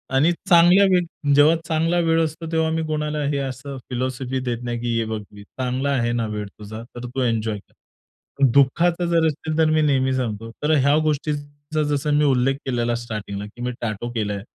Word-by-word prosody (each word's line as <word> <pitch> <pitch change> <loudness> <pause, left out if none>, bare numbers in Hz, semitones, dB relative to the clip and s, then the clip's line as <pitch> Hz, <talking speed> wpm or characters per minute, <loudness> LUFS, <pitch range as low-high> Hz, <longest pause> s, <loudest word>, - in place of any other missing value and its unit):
आणि 150 +6 +4 0.2
चांगल्या 175 +3 +7
वेळ 170 -5 0
जेव्हा 150 +3 +6
चांगला 165 +1 +1
वेळ 165 0 +3
असतो 160 +1 -5
तेव्हा 160 -1 +1
मी 160 0 -1
कोणाला 150 -1 -2
हे 145 0 0
असं 135 0 -5
फिलॉसॉफी 130 +1 -2
देत 120 -2 -3
नाही, 120 -1 -3
की 120 0 -1
"ये 115 - +1
वक्त 105 -1 -5
भी" 100 0 -11
चांगला 130 +5 -3
आहे 120 -3 +1
ना 115 -1 0
वेळ 105 -1 -4
तुझा, 105 +2 -9
तर 120 0 -6
तू 130 +2 -4
एन्जॉय 115 -3 0
कर. - - -26 0.8
दुःखाचा 170 +6 +3
जर 165 -1 +3
असेल 155 +1 -3
तर 160 -1 +4
मी 155 0 +3
नेहमी 135 -3 +2
सांगतो. 115 -3 -3
तर 150 - +2
ह्या 140 0 +4
गोष्टींचा 145 0 -2
जसं 145 0 0
मी 150 - +3
उल्लेख 135 -1 +2
केलेला 120 -2 0
स्टार्टिंगला, 105 -4 -5
की 110 +4 -12
मी 125 - -1
टॅटू 115 +1 -3
केलंय, 105 -3 -2
135 Hz, 195 wpm, -22 LUFS, 120-155 Hz, 0.8 s, चांगल्या